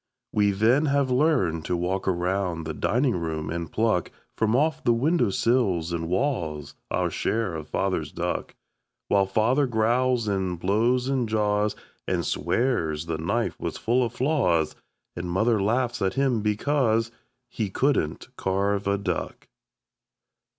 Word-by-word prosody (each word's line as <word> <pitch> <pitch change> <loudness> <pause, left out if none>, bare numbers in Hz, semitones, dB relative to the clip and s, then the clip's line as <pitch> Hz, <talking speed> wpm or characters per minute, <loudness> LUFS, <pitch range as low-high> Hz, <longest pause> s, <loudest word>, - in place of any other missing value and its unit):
We 105 -1 +3
then 115 +9 +3
have 140 -2 +1
learned 125 - +2
to 90 - 0
walk 90 +3 -2
around 90 -1 0
the 80 0 -4
dining 125 - +1
room 80 -2 -3
and 85 -1 -4
pluck 110 -6 +1 0.3
From 110 +1 +1
off 155 +4 +1
the 120 - +3
windowsills 115 - +1
and 85 -1 -3
walls 85 - -1 0.2
Our - - 0
share 110 -5 -1
of 80 -2 -6
Father's - - -1
duck - - -3 0.5
While 100 -1 +3
Father 125 +8 +2
growls 120 +1 +1
and 95 -3 -1
blows 115 +7 +1
and 130 -4 0
jaws 105 -1 +1 0.3
And - - 0
swears 85 - 0
the 80 -1 -3
knife 80 - -1
was - - -4
full 125 +3 +1
of 115 - -2
flaws 120 - +1 0.4
And 85 0 -4
Mother 110 +4 +2
laughs 120 +3 0
at 95 -1 0
him 135 -5 +1
because 115 +1 +1 0.4
He 110 -4 -3
couldn't 125 - -1
carve 100 +1 0
a 100 0 +2
duck. 100 - -4
105 Hz, 145 wpm, -25 LUFS, 90-125 Hz, 0.5 s, We